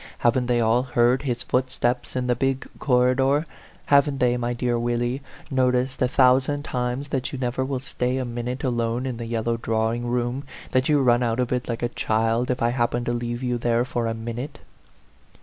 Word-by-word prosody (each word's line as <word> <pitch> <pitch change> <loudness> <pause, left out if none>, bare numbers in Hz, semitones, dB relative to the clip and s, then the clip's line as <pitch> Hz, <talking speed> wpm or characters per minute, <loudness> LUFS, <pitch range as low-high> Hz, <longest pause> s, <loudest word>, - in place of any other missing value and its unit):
Haven't 120 +1 +2
they 120 -1 +2
all 115 +1 +3
heard 125 0 +2
his 125 -4 -2
footsteps 125 -1 -1
in 125 -1 0
the 125 - +2
big 135 +2 -1
corridor? 130 +3 +3 0.4
Haven't 140 0 +4
they, 125 -1 +3
my 120 0 -1
dear 120 0 0
Willie, 120 +2 -1 0.3
noticed 130 0 +1
a 125 - +4
thousand 130 +3 +3
times 125 +2 -2
that 135 -1 -2
you 135 - -5
never 125 0 -1
will 135 0 -2
stay 125 -1 -2
a 130 - -1
minute 120 +3 -4
alone 120 -1 0
in 125 -3 -3
the 115 -1 -5
yellow 115 0 -1
draw 110 0 0
ing 120 0 -3
room 120 +2 -1 0.3
that 130 +2 +2
you 145 -2 +4
run 120 -1 +4
out 115 0 0
of 125 -1 0
it, 125 0 -1
like 120 0 -3
a - - +3
child, 115 +1 0
if 125 -2 0
I 120 - +3
happen 120 0 0
to 120 - 0
leave 120 +1 -3
you 125 -1 -1
there 120 +1 +1
for 120 -2 -2
a 115 - -2
minute?" 120 +5 -5
125 Hz, 200 wpm, -24 LUFS, 120-130 Hz, 0.4 s, Haven't